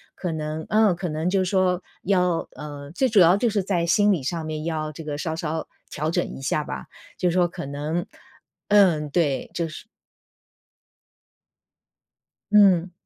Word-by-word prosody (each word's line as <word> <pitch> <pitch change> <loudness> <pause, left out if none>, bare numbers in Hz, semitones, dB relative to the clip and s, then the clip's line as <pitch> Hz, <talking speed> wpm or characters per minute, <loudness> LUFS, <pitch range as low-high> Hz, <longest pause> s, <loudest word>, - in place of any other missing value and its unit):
可 180 - -3
能 155 0 -4
嗯， 215 -4 +4
可 175 0 -4
能 155 +3 -1
就 195 +1 +2
是 - - -2
说 185 -2 +2 0.2
要 180 -3 +1
呃， 145 -1 -8
最 260 +10 +1
主 215 -3 +4
要 175 +1 +7
就 235 +2 +1
是 205 -2 0
在 175 -3 0
心 205 +5 +4
理 155 - -2
上 160 +4 -3
面， 155 -1 -4
要 155 -2 -2
这 155 +2 -9
个 150 -1 -4
稍 160 +1 -3
稍 160 -1 -3 0.2
调 155 +1 -2
整 175 +1 0
一 - - -9
下 150 +3 0
吧， - - -6 0.3
就 180 - +1
是 - - -1
说 180 -1 +4
可 160 - -7
能 150 +5 -3 0.6
嗯， 180 -8 +4
对， 145 -3 0
就 170 -1 -1
是 155 - -9 2.7
嗯。 190 -4 +5
170 Hz, 185 characters per minute, -24 LUFS, 155-185 Hz, 2.7 s, 要